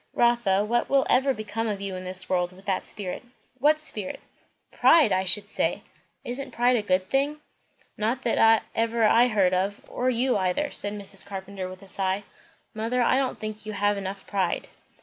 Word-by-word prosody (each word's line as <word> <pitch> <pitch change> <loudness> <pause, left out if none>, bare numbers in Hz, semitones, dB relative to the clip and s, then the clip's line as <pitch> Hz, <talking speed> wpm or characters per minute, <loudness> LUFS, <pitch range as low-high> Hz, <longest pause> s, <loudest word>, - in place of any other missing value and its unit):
"Rotha, 235 -5 +3
what 240 +2 0
will 275 -1 +3
ever 270 +2 +4
become 220 -1 -3
of 205 -2 -2
you 195 -1 -4
in 185 0 -7
this 185 0 -2
world, 180 -1 0
with 190 +2 -17
that 190 -2 -1
spirit?" 190 -3 -5 0.4
"What 300 +4 +4
spirit?" 215 -11 -5 0.5
"Pride, 310 -10 +5
I 185 0 +2
should 205 +2 +1
say." - - -1 0.4
"Isn't 260 +3 -4
pride 245 +1 +2
a 230 - +1
good 185 -2 0
thing?" 285 +3 +1 0.6
"Not 235 +5 -1
that 225 -1 +4
ever 230 0 0
I 230 +3 +5
heard 195 -6 +2
of, 195 +3 0
or 250 +1 -1
you 250 0 +1
either," 190 +10 0
Mrs. 200 -1 +1
Carpenter 195 -1 -6
said - - -5
with 185 +1 -11
a - - -14
sigh. 190 +1 -1 0.5
"Mother, 230 +3 0
I 260 - +3
don't 265 -2 -2
think 215 0 -6
you 215 - -4
have 205 0 +1
enough 195 0 -6
pride." 190 -4 -1
210 Hz, 190 wpm, -26 LUFS, 190-240 Hz, 0.6 s, Pride